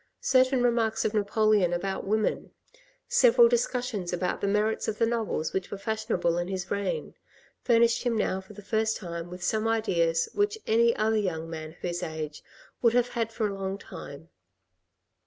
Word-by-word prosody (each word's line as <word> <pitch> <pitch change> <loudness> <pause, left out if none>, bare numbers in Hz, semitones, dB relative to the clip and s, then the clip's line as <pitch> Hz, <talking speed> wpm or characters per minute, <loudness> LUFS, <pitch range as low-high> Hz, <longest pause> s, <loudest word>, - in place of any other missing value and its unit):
Certain 255 -1 +3
remarks 225 -2 +1
of 215 - 0
Napoleon 210 -3 +2
about 190 +2 -3
women, 215 +1 0 0.6
several 480 0 +6
dis 480 +1 +2
cussions 245 -8 -3
about 180 0 -2
the - - 0
merits 210 +2 +1
of 215 - -2
the 230 - +3
novels 225 -9 -2
which 190 -1 -2
were - - -5
fashionable 205 -5 -1
in 175 - -2
his 185 -1 -4
reign, 200 - -2 0.5
furnished 235 0 +3
him 240 -2 0
now 190 -2 0
for 190 +2 -14
the 205 - -12
first 220 +1 0
time 170 -2 -6
with 180 0 -8
some 215 +3 0
ideas 170 -7 +1
which 410 +1 +1
any 235 +1 +3
other 220 +1 +1
young 165 -5 -2
man 160 -1 -6
of 160 - -16
his 175 0 -4
age 155 -3 -5 0.4
would 235 -2 +4
have 245 0 +2
had 230 -2 -2
for 225 -1 -1
a 200 - -4
long 195 0 -3
time. 165 -5 -10
210 Hz, 180 wpm, -27 LUFS, 180-230 Hz, 0.6 s, several